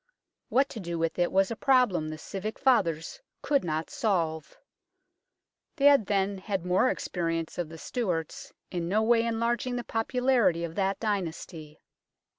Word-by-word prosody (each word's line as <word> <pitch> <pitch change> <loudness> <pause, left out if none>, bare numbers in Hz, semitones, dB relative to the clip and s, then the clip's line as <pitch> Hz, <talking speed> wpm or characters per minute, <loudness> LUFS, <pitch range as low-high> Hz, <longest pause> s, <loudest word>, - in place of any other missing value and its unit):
What 270 +2 +3
to 225 - -7
do 170 -3 -4
with 165 +1 -1
it 175 - +2
was 195 +1 +2
a - - -2
problem 235 - +2
the 155 - -6
civic 195 +7 -5
fathers 195 - +1 0.2
could 280 -2 +2
not 160 -1 -3
solve. 165 -8 -1 1.2
They 280 - 0
had 280 -8 +6
then 195 -1 0
had 190 -2 -3
more 185 +8 +3
experience 165 -5 -3
of 170 -3 -2
the 165 - -9
Stuarts, 175 - -3 0.2
in 175 -2 -3
no 215 +3 +2
way 230 0 +4
enlarging 235 +2 -1
the 245 - -3
popularity 235 -6 +1
of 165 -1 -4
that 195 +1 0
dynasty. 170 -6 -4
195 Hz, 155 wpm, -28 LUFS, 165-235 Hz, 1.2 s, had